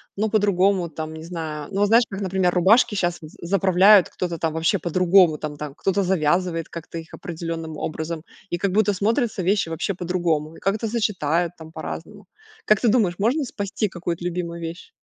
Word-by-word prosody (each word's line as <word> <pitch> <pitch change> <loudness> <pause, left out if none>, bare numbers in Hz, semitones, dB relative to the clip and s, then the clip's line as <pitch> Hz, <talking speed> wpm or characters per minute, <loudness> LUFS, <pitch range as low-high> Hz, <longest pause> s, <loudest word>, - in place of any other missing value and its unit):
ну, 215 +2 0
по-другому, 195 -3 +2
там, 155 0 -6
не 160 0 -9
знаю. 160 -4 -5
Ну 195 - -2
вот, 205 - +4
знаешь, 230 +3 +5
как, 195 0 -6
например, 190 -2 +1
рубашки 210 +5 +4
щас 175 -3 0
з 155 -1 -12
заправляют 190 +2 +5
кто-то, 175 -2 -4
там, 160 -1 -1
вообще 165 +5 +1
по-другому, 175 -1 +4
там 150 -1 -6
там. 145 -2 -7
Кто-то 195 +3 0
завязывает 175 -1 0
как-то 170 0 -8
их 165 0 -9
определенным 165 -1 -5
образом. 160 +1 -4 0.3
И 175 - 0
как 195 +2 -1
будто 205 +1 +3
смотрятся 215 +2 0
вещи 195 +1 +1
вообще 165 +4 -2
по-другому. 170 -4 -1
И - - -13
как 195 +1 0
это 225 +1 -3
сочетают, 175 -7 0
там, 160 0 -12
по-разному. - - -7 0.4
Как 215 - +3
ты 245 - +1
думаешь, 210 -6 +3
можно 250 +9 +1
спасти 205 -3 -3
какую-то 175 -1 -4
любимую 170 -1 -3
вещь? 165 - -7
180 Hz, 190 wpm, -23 LUFS, 165-200 Hz, 0.4 s, знаешь